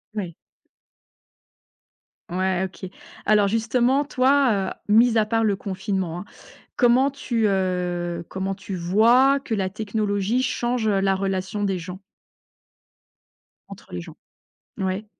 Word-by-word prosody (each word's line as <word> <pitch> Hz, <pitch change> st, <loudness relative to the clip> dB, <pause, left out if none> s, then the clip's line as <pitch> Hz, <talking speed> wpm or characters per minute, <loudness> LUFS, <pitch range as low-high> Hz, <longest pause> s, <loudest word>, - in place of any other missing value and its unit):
Ouais. 180 Hz, -6 st, -4 dB, 2.0 s
Ouais, 185 Hz, 0 st, 0 dB
OK. 185 Hz, 0 st, -8 dB, 0.4 s
Alors 210 Hz, -1 st, +4 dB
justement, 240 Hz, +5 st, +1 dB
toi, 255 Hz, -8 st, +2 dB
heu, 210 Hz, -, -4 dB
mis 230 Hz, 0 st, +5 dB
à 215 Hz, -, +3 dB
part 225 Hz, +1 st, 0 dB
le 205 Hz, -3 st, +1 dB
confinement, 190 Hz, -3 st, -3 dB
hein, 185 Hz, -, -8 dB, 0.5 s
comment 255 Hz, +3 st, +4 dB
tu, 235 Hz, -5 st, -1 dB
heu, 180 Hz, -3 st, -1 dB
comment 190 Hz, 0 st, -3 dB
tu 195 Hz, 0 st, -7 dB
vois 235 Hz, +10 st, +4 dB
que 235 Hz, -, -5 dB
la 190 Hz, -2 st, -1 dB
technologie 210 Hz, +2 st, -1 dB
change 245 Hz, -2 st, -1 dB
la 195 Hz, -1 st, +2 dB
relation 195 Hz, +2 st, -2 dB
des 190 Hz, -2 st, 0 dB
gens? 180 Hz, +3 st, -8 dB, 1.7 s
Entre -, -, -13 dB
les 90 Hz, -, -4 dB
gens. -, -, -12 dB, 0.6 s
Ouais. 190 Hz, +2 st, -2 dB
200 Hz, 120 wpm, -23 LUFS, 190-230 Hz, 2.0 s, mis